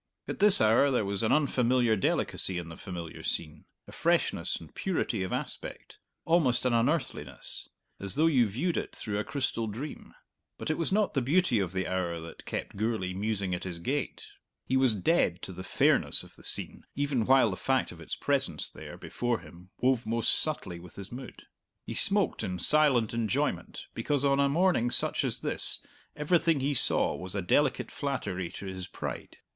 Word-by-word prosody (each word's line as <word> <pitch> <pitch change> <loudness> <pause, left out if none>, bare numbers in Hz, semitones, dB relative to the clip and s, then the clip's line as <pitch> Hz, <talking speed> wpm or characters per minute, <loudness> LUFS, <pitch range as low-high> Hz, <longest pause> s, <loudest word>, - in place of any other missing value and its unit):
At - - -5
this 205 -1 +8
hour 110 +6 +4
there 125 -6 +1
was 100 -1 0
an 110 - +1
unfamiliar 125 -5 +2
delicacy 95 -2 0
in 85 -1 -5
the 80 - -9
familiar 85 -3 -8
scene, 80 -1 -3 0.2
a - - -11
freshness - - +1
and 80 - -10
purity 160 - -2
of 95 - -3
aspect - - -6 0.3
almost 135 -8 +2
an 125 - +2
unearthliness 125 +8 -2 0.3
as 100 -1 -3
though 155 +3 +3
you 130 -8 +4
viewed 145 - -2
it - - -4
through 105 -2 -3
a - - -1
crystal 125 -5 -2
dream. 125 +8 -7 0.4
But - - -3
it 155 - -2
was 165 - +1
not 210 +1 +1
the 135 - +1
beauty 145 - +2
of 95 -3 -2
the 95 0 -2
hour 85 -2 -2
that 80 0 -11
kept - - -5
Gourlay 105 -4 -1
musing 100 -1 -2
at 90 - -3
his 90 -2 -4
gate. 135 +12 -3 0.4
He 130 - -1
was 130 -4 +3
dead 95 - +1
to 95 - -6
the 90 - -8
fairness - - +2
of - - -15
the - - -17
scene, - - -1
even 140 -5 0
while 130 -4 +5
the - - -3
fact 130 +6 0
of 85 - -12
its 80 - -5
presence - - +1
there - - -10
before 120 -1 -2
him 90 +2 -15
wove 125 -3 +1
most 115 +1 +1
subtly 95 - -2
with 90 0 -13
his 100 -1 -7
mood. 125 +1 -9 0.4
He - - -5
smoked - - +4
in 90 -1 -3
silent 135 - +4
enjoyment 115 -3 -2
because 145 -1 -1
on 140 0 +3
a 140 0 +3
morning 165 -6 +2
such - - +4
as - - -2
this - - +4 0.4
everything 160 +1 +2
he 140 +2 0
saw 120 - +4
was 90 +5 -7
a 100 - -2
delicate 145 +12 +1
flattery 120 - -3
to - - -8
his 95 -1 -5
pride. - - -7
115 Hz, 190 wpm, -29 LUFS, 95-140 Hz, 0.4 s, this